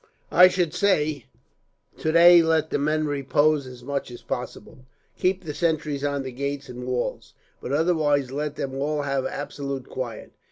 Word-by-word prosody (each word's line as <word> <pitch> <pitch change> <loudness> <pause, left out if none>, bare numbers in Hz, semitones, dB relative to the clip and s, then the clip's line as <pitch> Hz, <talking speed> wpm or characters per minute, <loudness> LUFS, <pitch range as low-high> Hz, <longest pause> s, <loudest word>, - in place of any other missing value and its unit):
"I 180 +1 +8
should 180 -3 0
say, 155 - +1 0.7
today 170 +2 +6
let 160 -1 +1
the - - 0
men 155 +2 0
repose 145 0 +1
as 125 -1 -11
much 140 +1 -3
as 120 - -11
possible; - - -6 0.4
keep 185 0 0
the 155 -3 -5
sentries 155 -3 -1
on 145 -1 -1
the 130 - -6
gates 140 +1 -4
and 125 0 -7
walls, 125 -1 -3 0.3
but - - -5
otherwise 145 -4 +1
let 145 +1 -3
them 130 - -4
all 145 +2 -1
have 135 -2 -1
absolute 140 -2 -5
quiet. 120 -4 -6
145 Hz, 160 wpm, -24 LUFS, 135-155 Hz, 0.7 s, I